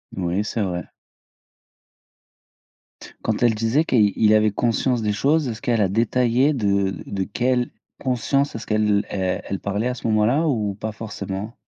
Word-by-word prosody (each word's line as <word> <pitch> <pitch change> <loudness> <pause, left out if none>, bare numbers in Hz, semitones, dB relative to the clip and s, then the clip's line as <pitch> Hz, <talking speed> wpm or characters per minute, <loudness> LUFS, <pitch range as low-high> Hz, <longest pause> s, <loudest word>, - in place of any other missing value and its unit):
Oui, 90 +3 -1
c'est 110 +1 -3
vrai. 90 -3 -2 2.4
Quand 110 +1 -1
elle 120 -2 +4
disait 115 +8 +1
qu'il 105 -8 +3
il 110 -1 +4
avait 110 0 +4
conscience 120 +3 0
des 105 -1 0
choses, 145 +7 +2
est-ce 115 -1 -5
qu'elle 115 -3 +1
a 95 - +2
détaillé 120 +6 +2
de 100 -5 0
de 95 -1 -2
quelle 125 +4 0 0.3
conscience 135 +2 0
est-ce 115 - -6
qu'elle 105 -1 +1
elle 95 -2 -1
elle 100 - -3
parlait 100 +4 -2
à 125 - -1
ce 115 - -5
moment-là 115 +9 +2
ou 110 -8 0
pas 110 +2 -4
forcément? 105 0 -6
110 Hz, 160 wpm, -22 LUFS, 100-125 Hz, 2.4 s, elle